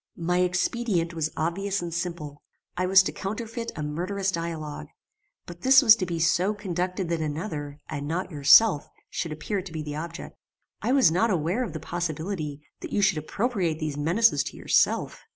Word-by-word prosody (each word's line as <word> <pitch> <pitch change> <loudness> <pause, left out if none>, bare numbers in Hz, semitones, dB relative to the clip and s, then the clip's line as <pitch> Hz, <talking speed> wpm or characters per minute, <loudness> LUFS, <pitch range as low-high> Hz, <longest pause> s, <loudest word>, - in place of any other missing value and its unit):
"My 180 +1 0
expedient 180 0 0
was 160 -2 -1
obvious 195 +5 -1
and 170 -1 -5
simple: 170 -4 -5 0.3
I 180 +1 0
was 190 0 +7
to - - -2
counterfeit 230 +4 -5
a 150 - -4
murderous 185 +6 -2
dialogue; 160 - -5 0.6
but 175 0 -11
this 265 +1 +6
was 220 -4 +9
to 185 - -2
be 170 -1 -3
so 175 +5 +2
conducted 185 -2 -3
that 165 -1 -1
another, 150 -2 -4
and 145 0 -5
not 180 +4 -3
yourself, 150 +4 +5 0.2
should 165 - -3
appear 190 +6 -3
to 185 -1 -10
be 160 -1 -4
the 150 0 -5
object. 165 +2 -7 0.5
I - - 0
was 265 -10 +5
not 205 +8 +2
aware 180 +6 0
of 240 - -5
the 160 - -5
possibility 160 -2 -4 0.2
that - - -8
you 205 - +1
should 190 -5 +3
appropriate 185 - -1
these 155 -2 -3
menaces 175 +11 +3
to - - -7
yourself. - - +1
175 Hz, 180 wpm, -26 LUFS, 155-195 Hz, 0.6 s, was